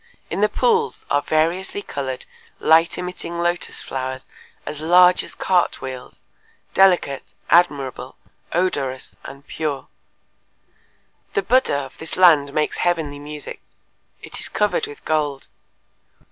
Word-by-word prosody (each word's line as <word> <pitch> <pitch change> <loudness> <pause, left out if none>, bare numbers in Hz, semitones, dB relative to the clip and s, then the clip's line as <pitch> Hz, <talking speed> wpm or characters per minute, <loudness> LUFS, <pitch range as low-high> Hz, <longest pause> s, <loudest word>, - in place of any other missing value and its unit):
In - - -1
the 210 - +4
pools 210 - +1
are 145 - +3
variously 170 +7 0
colored, 130 -2 -4 0.3
light 165 +2 +4
emitting 180 -1 -5
lotus 175 +1 -1
flowers 130 0 -4 0.4
as 150 0 -5
large 180 +2 +6
as - - -8
cart 180 -2 +1
wheels, 130 -1 -8 0.5
delicate, 180 -8 +4 0.3
admirable, 145 -7 +2 0.4
odorous 140 -8 -1
and 140 +1 -10
pure…" 150 -4 -4 1.5
"The 420 - +2
Buddha 255 - +3
of 135 -1 -7
this 160 - -3
land 155 -6 +6
makes 150 +1 0
heavenly 160 -5 0
music. 150 0 -8 0.6
It - - -5
is - - -2
covered 460 -3 0
with 435 0 -12
gold. 150 -3 -1
155 Hz, 120 wpm, -21 LUFS, 140-180 Hz, 1.5 s, large